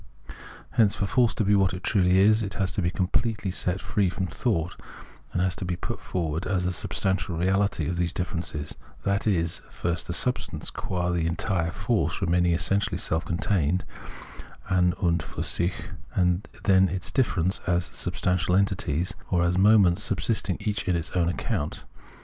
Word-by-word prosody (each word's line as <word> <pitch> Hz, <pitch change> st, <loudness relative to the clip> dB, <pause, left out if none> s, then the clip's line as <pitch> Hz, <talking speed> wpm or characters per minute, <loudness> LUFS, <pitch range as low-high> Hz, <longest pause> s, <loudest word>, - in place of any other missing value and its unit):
Hence 105 Hz, -3 st, +3 dB
for 100 Hz, -, -1 dB
force 120 Hz, +3 st, +2 dB
to -, -, +1 dB
be 100 Hz, 0 st, +3 dB
what 95 Hz, -2 st, +3 dB
it 90 Hz, -, -8 dB
truly 95 Hz, -3 st, +3 dB
is, 105 Hz, +3 st, +5 dB
it 100 Hz, -2 st, -4 dB
has 95 Hz, -1 st, -1 dB
to -, -, -2 dB
be 85 Hz, -, +1 dB
completely 95 Hz, +2 st, -1 dB
set 90 Hz, 0 st, -1 dB
free 100 Hz, -1 st, 0 dB
from 95 Hz, +1 st, -2 dB
thought, 95 Hz, -4 st, -1 dB, 0.6 s
and 90 Hz, -1 st, -1 dB
put -, -, -4 dB
forward 85 Hz, -1 st, -2 dB
as 95 Hz, -2 st, 0 dB
the 90 Hz, 0 st, 0 dB
substantial 95 Hz, 0 st, -1 dB
reality 95 Hz, -2 st, +1 dB
of 85 Hz, 0 st, -2 dB
these 85 Hz, -1 st, +1 dB
differences, 80 Hz, -4 st, -3 dB, 0.3 s
that 100 Hz, +2 st, 0 dB
is, 85 Hz, -5 st, +1 dB
first 85 Hz, -1 st, -2 dB
the -, -, -3 dB
substance -, -, -1 dB
qua 90 Hz, -1 st, -2 dB
the 85 Hz, -2 st, 0 dB
entire 85 Hz, 0 st, -1 dB
force -, -, -1 dB
remaining 90 Hz, 0 st, +2 dB
essentially 100 Hz, +4 st, 0 dB
self 80 Hz, +1 st, -1 dB
contained 90 Hz, -1 st, 0 dB, 0.8 s
(an 90 Hz, -1 st, +3 dB
und 85 Hz, -1 st, +3 dB
fiir -, -, -5 dB
sich), 85 Hz, +1 st, +1 dB, 0.3 s
and 90 Hz, +1 st, +1 dB, 0.2 s
then 95 Hz, -2 st, +5 dB
its 95 Hz, +2 st, -4 dB
differences 95 Hz, -, +1 dB
as 90 Hz, -1 st, +2 dB
substantial 90 Hz, 0 st, 0 dB
entities, 90 Hz, -4 st, 0 dB, 0.2 s
or 90 Hz, -2 st, +2 dB
as 85 Hz, +1 st, +1 dB
moments 95 Hz, -2 st, +5 dB
subsisting -, -, 0 dB
each 105 Hz, -1 st, -2 dB
on 90 Hz, -, +2 dB
its 85 Hz, +2 st, -2 dB
own 85 Hz, -2 st, +1 dB
account. 85 Hz, -3 st, -3 dB
90 Hz, 165 wpm, -26 LUFS, 85-100 Hz, 0.8 s, is